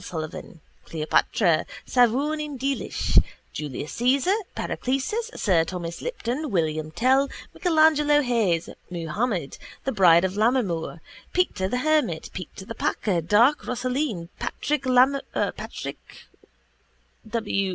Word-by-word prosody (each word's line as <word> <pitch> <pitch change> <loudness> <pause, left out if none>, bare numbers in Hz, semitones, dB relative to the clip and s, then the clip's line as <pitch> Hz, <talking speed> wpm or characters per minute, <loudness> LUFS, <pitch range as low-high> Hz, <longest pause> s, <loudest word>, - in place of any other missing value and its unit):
Sullivan, 160 -1 -7 0.2
Cleopatra, 160 +2 +2 0.2
Savourneen 285 +4 +1
Deelish, 275 +2 +1 0.3
Julius 150 -1 -5
Caesar, 265 +9 +2 0.2
Paracelsus, 275 - -2
sir 175 -6 +3
Thomas 170 0 -5
Lipton, 305 - -3
William 155 -5 0
Tell, 260 - +2 0.2
Michelangelo 310 -3 +4
Hayes, 215 -10 +1 0.2
Muhammad, 175 - -2 0.2
the 270 - -1
Bride 180 -5 +5
of 190 +1 -2
Lammermoor, 205 -8 0 0.3
Peter 205 - +1
the 250 - -1
Hermit, 300 - +1
Peter 185 +1 -8
the 230 - -6
Packer, 190 -6 0
Dark 230 - +4
Rosaleen, 250 - -2
Patrick 300 -1 -2 2.4
W. 210 -4 -1
225 Hz, 100 wpm, -25 LUFS, 170-275 Hz, 2.4 s, Bride